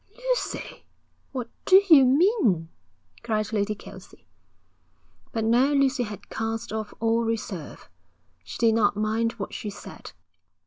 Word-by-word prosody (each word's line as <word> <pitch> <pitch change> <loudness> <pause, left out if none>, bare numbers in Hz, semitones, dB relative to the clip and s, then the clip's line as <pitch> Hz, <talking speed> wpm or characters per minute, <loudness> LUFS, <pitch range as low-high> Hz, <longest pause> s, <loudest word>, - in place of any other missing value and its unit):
'Lucy, - - -3 0.4
what 250 -4 -4 0.2
do 380 0 +7
you 295 -7 +8
mean?' 255 - +2 0.5
cried 215 -1 -2
Lady 210 0 0
Kelsey. - - -14 1.1
But 225 -1 -2
now 250 +5 +3
Lucy 275 -1 +2
had 210 -3 -6
cast 225 0 -3
off 220 -1 -4
all 230 +1 +1
reserve. 215 -8 -5 0.6
She 90 - -8
did 230 -1 +3
not 210 -2 +2
mind 220 +2 0
what 210 -4 -7
she 210 - -5
said. 205 - -11
225 Hz, 130 wpm, -25 LUFS, 215-260 Hz, 1.1 s, you